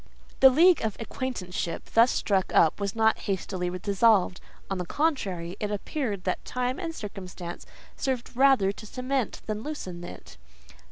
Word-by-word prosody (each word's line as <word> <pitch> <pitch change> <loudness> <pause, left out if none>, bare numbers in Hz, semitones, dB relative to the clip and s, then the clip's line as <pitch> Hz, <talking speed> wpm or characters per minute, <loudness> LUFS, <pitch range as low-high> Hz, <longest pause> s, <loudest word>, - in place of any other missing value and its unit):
The 265 - +9
league 335 +7 +5
of 220 -2 -2
acquaintanceship 195 -8 -4
thus 230 +2 +6
struck 195 -6 0
up 160 +3 +4
was 200 0 -2
not 220 0 +3
hastily 185 -2 -2
dissolved; 200 -1 +3 0.3
on 195 -1 -3
the 180 - -2
contrary, 190 - -1
it 210 - -2
appeared 210 - -3
that 185 - -2
time 250 +1 -2
and 330 -3 -4
circumstances 185 - -7 0.3
served 255 -3 -3
rather 260 -7 +5
to 210 - -11
cement 255 +1 -2
than 215 -1 -3
loosen 185 - -6
it. 70 - -10
210 Hz, 150 wpm, -27 LUFS, 185-255 Hz, 0.3 s, The